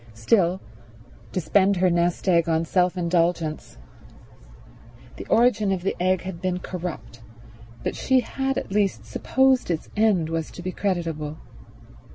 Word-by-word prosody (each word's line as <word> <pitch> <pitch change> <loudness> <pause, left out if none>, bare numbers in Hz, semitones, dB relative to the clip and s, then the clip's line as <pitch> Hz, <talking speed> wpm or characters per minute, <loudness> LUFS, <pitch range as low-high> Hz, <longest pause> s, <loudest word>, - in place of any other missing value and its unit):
Still, 175 - +2 0.7
to - - -1
spend 195 +4 +3
her 180 0 +2
nest 175 +2 0
egg 170 -2 +3
on 165 0 +1
self 180 +1 +1
indulgence— 170 - -1 1.4
The - - -8
origin 220 -4 +3
of 185 -2 -2
this 195 - 0
egg 185 0 +1
had 185 -3 -7
been 185 -1 -1
corrupt, 170 -11 -7 0.6
but - - -2
she 260 -1 +2
had 270 +2 -2
at - - -4
least 195 - 0
supposed 260 - +1
its 165 -2 -2
end 205 -7 +2
was 165 -1 -2
to 175 - -9
be 185 - -3
creditable. 165 -6 -3
180 Hz, 145 wpm, -24 LUFS, 165-195 Hz, 1.4 s, spend